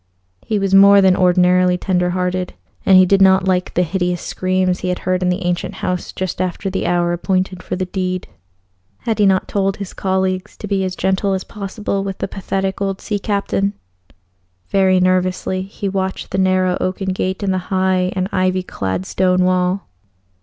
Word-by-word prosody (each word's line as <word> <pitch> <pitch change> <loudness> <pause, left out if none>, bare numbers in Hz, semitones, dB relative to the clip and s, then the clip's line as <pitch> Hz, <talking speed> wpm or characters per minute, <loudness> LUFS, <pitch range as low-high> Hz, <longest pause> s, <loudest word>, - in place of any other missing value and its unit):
He 215 - -2
was 195 -1 -1
more 200 +1 +8
than 190 -1 +5
ordinarily 180 0 +3
tender 180 -1 0
hearted, 180 0 -2 0.3
and 190 - +7
he 185 - +7
did 195 +1 +3
not 190 0 +5
like 180 -1 +1
the 180 - +3
hideous 180 0 -1
screams 185 -1 0
he 185 - -4
had 180 0 0
heard 185 0 +1
in 180 - +1
the 180 +1 -2
ancient 175 0 -2
house 180 -1 -3
just 185 -1 -4
after 185 +2 -2
the 190 - -2
hour 175 0 +1
appointed 185 +1 -1
for - - -4
the 185 0 -2
deed. 185 -1 -3 0.7
Had 225 -2 -2
he 205 - +5
not 190 -1 +2
told 195 -1 0
his 200 -2 -7
colleagues 190 -1 -2
to 210 - -7
be 195 -1 0
as 185 -1 -3
gentle 190 +1 0
as 190 - -2
possible 200 -1 -4
with 195 -1 -4
the - - -3
pathetic 195 0 -3
old 195 -1 -1
sea 205 -1 -3
captain? 200 -1 -1 1.0
Very 190 -1 +3
nervously 185 0 +1
he 195 +1 -5
watched 190 -1 -3
that 190 - -2
narrow 185 -1 +2
oaken 190 +1 -2
gate 185 +2 -2
in 195 - +1
the 185 - 0
high 185 -1 +1
and 185 0 0
ivy 185 0 +1
clad 95 - -3
stone 185 - +1
wall. 185 +1 0
185 Hz, 190 wpm, -18 LUFS, 180-195 Hz, 1.0 s, more